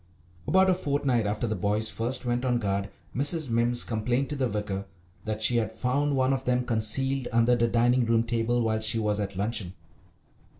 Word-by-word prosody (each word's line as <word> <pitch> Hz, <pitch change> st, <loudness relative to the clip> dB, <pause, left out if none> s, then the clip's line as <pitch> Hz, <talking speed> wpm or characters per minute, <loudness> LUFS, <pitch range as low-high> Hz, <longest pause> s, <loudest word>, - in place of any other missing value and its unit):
About 190 Hz, 0 st, +4 dB
a 185 Hz, -, +4 dB
fortnight 140 Hz, -, 0 dB
after 105 Hz, +3 st, -1 dB
the 110 Hz, -1 st, -1 dB
boys 105 Hz, +3 st, 0 dB
first 120 Hz, +3 st, -3 dB
went 120 Hz, 0 st, -1 dB
on 125 Hz, -2 st, +1 dB
guard 100 Hz, -3 st, -2 dB, 0.3 s
Mrs. 145 Hz, +1 st, 0 dB
Mimms 120 Hz, +1 st, +2 dB
complained 120 Hz, +4 st, -1 dB
to -, -, -2 dB
the 135 Hz, -2 st, 0 dB
vicar 100 Hz, -2 st, -3 dB, 0.4 s
that 110 Hz, 0 st, -2 dB
she 120 Hz, +2 st, +3 dB
had 110 Hz, -4 st, 0 dB
found 140 Hz, +3 st, 0 dB
one 130 Hz, 0 st, +2 dB
of 135 Hz, -1 st, -2 dB
them 125 Hz, -1 st, 0 dB
concealed 125 Hz, +4 st, 0 dB
under 115 Hz, +1 st, +3 dB
the 120 Hz, -1 st, +2 dB
dining 120 Hz, +1 st, +2 dB
room 115 Hz, 0 st, +3 dB
table 115 Hz, +1 st, 0 dB
while 110 Hz, -1 st, 0 dB
she 110 Hz, +1 st, 0 dB
was 105 Hz, -1 st, 0 dB
at 100 Hz, -1 st, -3 dB
luncheon. 100 Hz, -2 st, -2 dB
120 Hz, 195 wpm, -27 LUFS, 110-130 Hz, 0.4 s, About